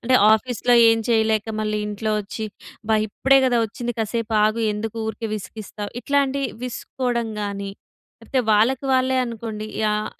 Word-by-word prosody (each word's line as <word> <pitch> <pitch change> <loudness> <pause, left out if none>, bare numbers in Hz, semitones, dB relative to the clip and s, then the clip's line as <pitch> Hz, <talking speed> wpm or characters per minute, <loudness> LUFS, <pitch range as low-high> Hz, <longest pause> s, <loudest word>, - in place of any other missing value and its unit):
అంటే, 255 +2 +2 0.2
ఆఫీస్‌లో 245 +1 +1 0.2
ఎం 225 0 +2
చేయలేక, 220 -1 +2 0.2
మళ్ళీ 215 0 -1
ఇంట్లో 210 +1 -2
వచ్చి, 210 +2 -6 0.4
అబ్బా! 220 0 +2
ఇప్పుడే 270 +6 +4
గదా 245 -2 +2
వచ్చింది, 240 +3 -4
కాసేపాగు, 220 0 +1
ఎందుకు 220 +2 -5
ఊరికే 220 +1 -4
విసిగిస్తావు, 210 0 -7
ఇట్లాంటియి, 275 -1 +1
విసుక్కోడం 245 -1 -2
గానీ, 200 -1 -4 0.5
లేకపోతే 265 - 0
వాళ్ళకి 235 +6 +3
వాళ్ళే 260 0 +2
అనుకోండి, 225 -3 -5 0.2
యాహ్, 210 0 0
225 Hz, 135 wpm, -22 LUFS, 215-250 Hz, 0.5 s, ఇప్పుడే